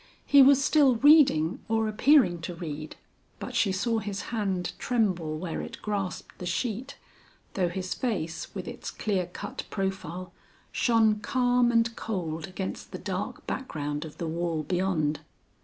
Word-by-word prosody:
He 285 - +7
was 275 +1 +6
still 285 -6 +5
reading, 260 - +5
or 220 0 +1
appearing 215 - +4
to 170 +1 -5
read, 155 -3 -6 0.4
but - - -7
she 200 - +2
saw 225 +4 0
his 200 -2 -4
hand 195 -5 -1
tremble 185 -10 0
where 165 0 -4
it - - -8
grasped 200 -3 -4
the 180 - -5
sheet, 240 +7 -3 0.6
though 180 -3 +1
his 185 +1 -3
face 190 -10 -3
with - - -5
its - - -6
clear 190 -4 -1
cut 180 - -6
profile, 190 -2 -4 0.4
shone 220 -3 +3
calm 245 +1 +2
and 230 0 +2
cold 165 -7 -4
against 185 0 -6
the - - -5
dark - - -4
background 150 - -3
of 155 -2 -10
the 170 - -3
wall 165 -1 -2
beyond. 165 -3 0
195 Hz, 150 wpm, -28 LUFS, 170-230 Hz, 0.6 s, He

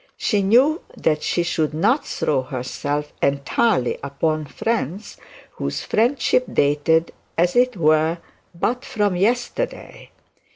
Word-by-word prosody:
She 210 -3 +1
knew 255 - +4 0.2
that 155 -1 +1
she 175 - 0
should 155 -3 -1
not 230 - +2
throw 140 -4 0
herself 140 +3 -4
entirely 140 - +1
upon 155 +3 -1
friends 205 - -3 0.4
whose 70 -1 -3
friendship 250 - +2
dated 150 +3 +2 0.3
as 175 +1 +2
it 250 -2 +3
were 155 +1 +3 0.4
but 245 +8 -1
from 205 -3 0
yesterday. 240 - -2
165 Hz, 115 wpm, -21 LUFS, 145-225 Hz, 0.4 s, knew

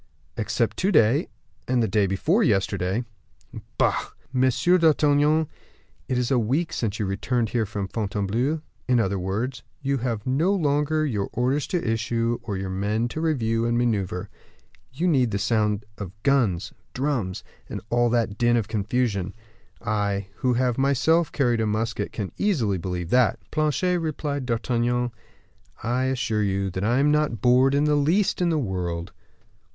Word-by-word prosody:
"Except 115 +1 -1
to 195 +3 +1
day, 140 - +4 0.4
and 125 -2 +2
the - - +1
day 105 -3 +2
before 155 - +1
yesterday." 95 - +1 0.7
"Bah!" - - +3 0.4
"Monsieur 130 +8 +3
d'Artagnan, 150 -1 +3 0.6
it 130 - 0
is 125 +1 0
a 130 - +4
week 135 +10 0
since 110 -3 -2
you 105 - -1
returned 115 +4 -1
here 115 -2 0
from 100 -1 -4
Fontainebleau; 110 +8 -1 0.3
in 125 -2 +3
other 100 -3 0
words, 115 +7 -3 0.2
you 140 0 +1
have 115 -3 -3
no 150 +9 +2
longer 155 -2 +1
your 105 -9 -2
orders 130 +5 0
to 175 -9 -2
issue, 115 +1 0
or 100 -3 -4
your 95 0 -4
men 105 +5 -1
to 155 - -4
review 115 -8 0
and 120 0 +1
maneuver. 100 -7 -1 0.6
You 160 +8 -1
need 130 -8 +3
the 100 - -1
sound 105 -1 0
of 95 -3 -6
guns, 120 -11 +1 0.2
drums, 125 -9 -1 0.3
and - - -4
all 120 0 +3
that 115 -3 0
din 120 0 +3
and 110 -4 -1
confusion; 105 -3 -1 0.5
I, 100 -2 -1
who 125 -1 +1
have 125 0 +1
myself 150 +5 +2
carried 120 -5 +1
a 110 - +1
musket, 110 -1 -2
can 100 -4 -4
easily 120 - +1
believe 90 -1 -4
that." 125 -2 +4
"Planchet," 160 +4 +1
replied 145 -4 -3
D'Artagnan, 120 +1 0 0.7
"I 125 +3 0
assure 125 -4 0
you 100 -1 0
I 115 +5 +2
am 145 +2 +3
not 150 -7 +1
bored 125 +5 +4
in 145 - +3
the 150 0 +3
least 165 +8 +2
in 175 - +3
the 160 - +1
world." 90 - -3
120 Hz, 160 wpm, -24 LUFS, 105-140 Hz, 0.7 s, day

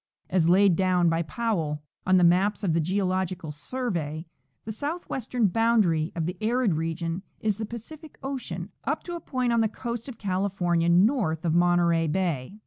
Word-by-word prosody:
As 170 -2 +3
laid 190 0 +5
down 180 -1 +3
by 165 0 +1
Powell* 160 -4 -2 0.2
on 185 0 +5
the 180 - +4
maps 195 +5 +3
of 175 -5 +1
the 165 - +2
Geological 185 -2 -1
Survey, 160 - -4 0.4
the 220 - -4
southwestern 255 -3 -2
boundary 200 -6 +2
of 165 -2 -1
the 180 +2 -4
arid 230 -2 +2
region 165 +2 -2 0.2
is 215 -1 -1
the 220 - -3
Pacific 300 +8 -10
ocean 210 -10 -5
up 300 +3 -2
to 345 - -6
a - - -4
point 255 -4 -1
on 230 - +3
the 220 - +3
coast 235 +2 -5
of 240 - -9
California 185 -3 0
north 180 - +3
of 160 - +2
Monterey 170 -1 +3
bay. 170 0 -2
185 Hz, 170 wpm, -26 LUFS, 170-225 Hz, 0.4 s, laid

